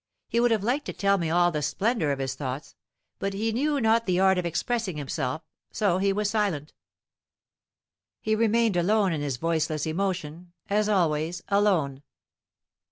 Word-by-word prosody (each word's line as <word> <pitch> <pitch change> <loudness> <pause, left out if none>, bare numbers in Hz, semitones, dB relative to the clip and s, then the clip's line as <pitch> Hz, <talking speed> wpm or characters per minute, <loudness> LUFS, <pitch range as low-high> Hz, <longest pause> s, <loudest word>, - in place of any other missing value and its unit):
He 235 - 0
would 240 0 +4
have 220 -4 +1
liked 260 +6 0
to - - -4
tell 200 0 +2
me 165 -2 -1
all 175 +1 +3
the 150 -2 -2
splendor 165 - 0
of 140 - -1
his 135 -1 -2
thoughts, 130 +1 -5 0.5
but 195 0 -2
he 220 +3 0
knew 285 +5 0
not 225 -1 +2
the 180 -1 +2
art 190 -1 +4
of 175 - -1
expressing 195 +1 -2
himself, 140 +1 -3 0.3
so 190 -4 +1
he 195 +1 +2
was 210 +1 0
silent. 200 -9 -1 1.5
He 220 - -1
remained 225 -1 +2
alone 195 +1 +2
in 150 - -2
his 140 -4 -2
voiceless 160 0 -1
emotion, 175 -1 -3 0.2
as 210 +1 +2
always 170 -3 0
alone. 185 -10 +2
185 Hz, 165 wpm, -26 LUFS, 155-215 Hz, 1.5 s, would